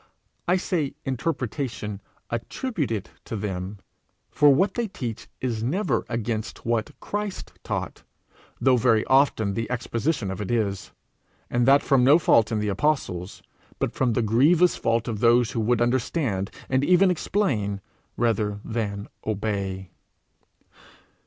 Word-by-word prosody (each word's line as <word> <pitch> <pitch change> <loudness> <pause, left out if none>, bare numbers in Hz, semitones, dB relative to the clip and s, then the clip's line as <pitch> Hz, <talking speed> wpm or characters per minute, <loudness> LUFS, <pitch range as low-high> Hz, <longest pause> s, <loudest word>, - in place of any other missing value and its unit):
I 180 +2 +4
say 165 -6 -1
interpretation 130 -6 -3 0.3
attributed 120 - -3
to - - -5
them; 100 -1 -4 0.5
for 145 -1 +6
what 180 +9 +3
they 235 -2 -1
teach 125 - -6
is 120 -4 -2
never 180 - 0
against 115 -1 -3
what 115 -1 -1
Christ 205 -1 -4
taught, - - -4 0.6
though 130 -1 +4
very 110 -1 +3
often 130 -7 +3
the 115 +2 -3
exposition 120 -2 -1
of 95 +2 -5
it 100 - -4
is 105 -5 -1 0.6
and 120 0 +2
that 140 +1 +6
from 135 -3 +3
no 140 +5 +7
fault 115 -9 +3
in 110 - +1
the 105 0 -1
apostles, 100 - -1 0.3
but - - -1
from 125 -3 +1
the 120 - +1
grievous 155 - +4
fault 115 0 0
of 110 -3 -3
those 120 0 +4
who - - -2
would 120 +1 +2
understand, 120 - 0 0.2
and 130 +1 +1
even 180 +4 +5
explain, 130 - 0 0.4
rather 105 -3 0
than 105 -3 -3 0.2
obey. 100 -3 -2
115 Hz, 135 wpm, -25 LUFS, 105-140 Hz, 0.6 s, no